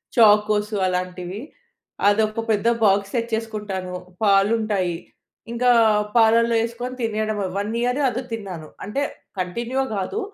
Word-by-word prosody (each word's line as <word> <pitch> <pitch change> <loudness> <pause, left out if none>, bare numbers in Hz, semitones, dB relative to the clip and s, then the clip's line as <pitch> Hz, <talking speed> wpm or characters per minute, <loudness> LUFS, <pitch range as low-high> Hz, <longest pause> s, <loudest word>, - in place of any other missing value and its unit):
Chocos 210 -1 +4
అలాంటివి. 180 +2 -3 0.7
అదొక 215 +2 +2
పెద్ద 215 +2 +1 0.2
బాక్స్ 200 -1 +2
తెచ్చేసుకుంటాను. 215 -5 -3 0.3
పాలుంటాయి 200 -3 +2 0.5
ఇంకా 245 +1 +3 0.5
పాలల్లో 230 +1 +4
యేసుకొని 240 +2 -4
తినేయడమే. 215 -2 -1
1 205 +2 -2
ఇయర్ 250 +3 0
అది 250 +1 -4
తిన్నాను. 185 -8 -6 0.2
అంటే 210 +8 -2 0.4
కంటిన్యూగా 235 +9 -2
కాదు. 195 - -2
215 Hz, 105 wpm, -22 LUFS, 195-230 Hz, 0.7 s, Chocos